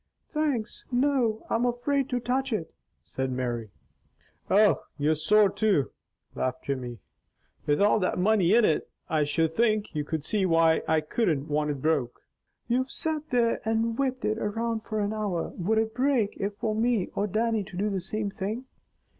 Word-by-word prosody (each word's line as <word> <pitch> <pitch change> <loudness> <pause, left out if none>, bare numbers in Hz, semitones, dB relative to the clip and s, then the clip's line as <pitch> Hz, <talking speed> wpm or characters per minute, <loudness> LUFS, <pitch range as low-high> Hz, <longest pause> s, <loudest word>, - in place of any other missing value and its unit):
"Thanks, 285 -8 -2
no! 245 -4 +1
I'm 230 - 0
afraid 260 +3 0
to 250 -2 0
touch 260 +2 -1
it," 175 -8 -3 0.3
said 130 0 -3
Mary. 120 -3 -3 0.8
"Oh, 205 +1 +5 0.2
you 150 +1 +2
are - - +5
sore 210 +7 +4
too!" 195 -8 +1 0.4
laughed 130 -1 -2
Jimmy. 125 -3 -4 0.7
"With 145 0 +2
all 205 +2 +4
that 185 - 0
money 195 0 +3
in 235 -2 +5
it, 155 - +1 0.2
I 155 -2 +2
should 160 +2 0
think 215 0 +1
you 150 - -1
could 155 0 -3
see 205 +5 0
why 165 -2 +4
I 160 -1 +2
wouldn't 155 -11 +1
want 150 0 0
it 140 -3 -4
broke." 145 -6 0 0.4
"You've 255 +2 +1
sat 310 0 -2
there 240 -2 +2
and 225 +1 0
whipped 260 0 -1
it 215 +1 0
around 225 +2 -1
for 215 -1 -2
an 205 +1 -1
hour. 205 -6 -2
Would 205 +5 0
it 220 0 +1
break 255 -5 +1
it 200 +1 -3
for 215 0 -1
me 225 -3 +1
or 205 - 0
Dannie 220 +1 0
to 185 - -10
do 205 +2 0
the 190 -2 -2
same 205 +3 -2
thing? 215 +7 -4
210 Hz, 180 wpm, -27 LUFS, 160-235 Hz, 0.8 s, Oh